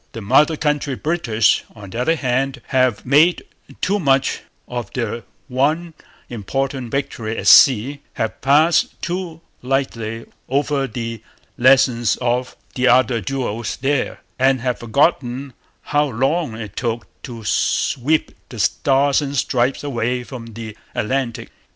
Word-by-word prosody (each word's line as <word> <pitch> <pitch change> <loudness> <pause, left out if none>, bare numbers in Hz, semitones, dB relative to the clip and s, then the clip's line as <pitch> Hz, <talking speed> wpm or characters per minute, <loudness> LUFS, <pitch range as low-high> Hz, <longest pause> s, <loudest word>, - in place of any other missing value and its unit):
The - - -6
mother 145 +9 +3
country 150 -3 -1
British, 125 -9 +1
on 100 -3 -11
the 115 - -3
other 165 +6 +2
hand, 135 -1 -1
have 130 -5 +1
made 150 +7 +4 0.4
too 205 +2 +1
much 135 -5 +1 0.3
of 120 -2 -5
their 115 -2 -3 0.3
one 155 +6 0 0.3
important 130 +3 -3
victory 115 -4 -3
at - - -4
sea, 135 +3 +6
have 110 - -3
passed 150 +5 +3
too 175 -2 -4 0.2
lightly 115 -4 -2 0.2
over 140 0 0
the 115 -2 -5 0.3
lessons 125 -3 +4
of 125 +1 -1 0.2
the 130 0 +1
other 125 -2 +4
duels 120 0 -3
there, 140 +1 -1 0.2
and 130 -1 +3
have 125 -1 -1
forgotten 130 +1 0 0.3
how 145 0 +1
long 135 +2 -1
it 110 -3 -8
took 120 -1 -2 0.2
to 115 -4 -8
sweep 135 +7 +1 0.2
the 120 - -9
Stars 135 +7 +2
and 140 -1 -3
Stripes 125 +2 0
away 125 -2 -1
from 120 -2 -9
the 110 -1 -8 0.2
Atlantic. 125 +1 -2
130 Hz, 130 wpm, -20 LUFS, 115-140 Hz, 0.4 s, sea